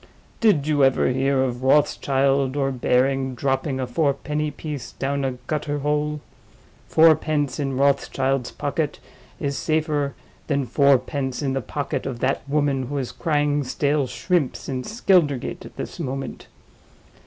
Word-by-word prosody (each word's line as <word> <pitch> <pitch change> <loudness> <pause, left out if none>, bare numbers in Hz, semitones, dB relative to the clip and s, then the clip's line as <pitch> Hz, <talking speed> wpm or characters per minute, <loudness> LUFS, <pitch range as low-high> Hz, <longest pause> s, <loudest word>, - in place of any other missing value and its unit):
Did 200 -11 +3
you 150 -2 +2
ever 135 -1 +3
hear 135 +1 +2
of 125 -1 -2
Rothschild 135 -1 +2
or 135 -1 +1
Baring 130 +1 +1
dropping 135 +2 -1
a 130 - -1
fourpenny 150 +3 -1
piece 145 -2 -6
down 140 +1 -2
a 135 -1 0
gutter 145 -1 -2
hole? 150 +1 -1 0.7
Fourpence 155 -3 +3
in 135 -2 -1
Rothschild's 135 -2 +1
pocket 145 +1 -2 0.4
is 140 -1 -2
safer 155 -3 0 0.3
than 140 -3 0
fourpence 135 0 +1
in 135 -2 0
the 135 - -1
pocket 140 +3 -3
of 130 -3 -4
that 135 +2 0
woman 140 -3 +1
who 145 +2 -3
is 130 -3 -3
crying 145 -3 0
stale 140 +1 0
shrimps 170 -1 -1
in 130 -2 -3
Skeldergate 180 - +1
at - - -16
this - - -6
moment. 135 +1 -5
140 Hz, 140 wpm, -23 LUFS, 135-150 Hz, 0.7 s, Did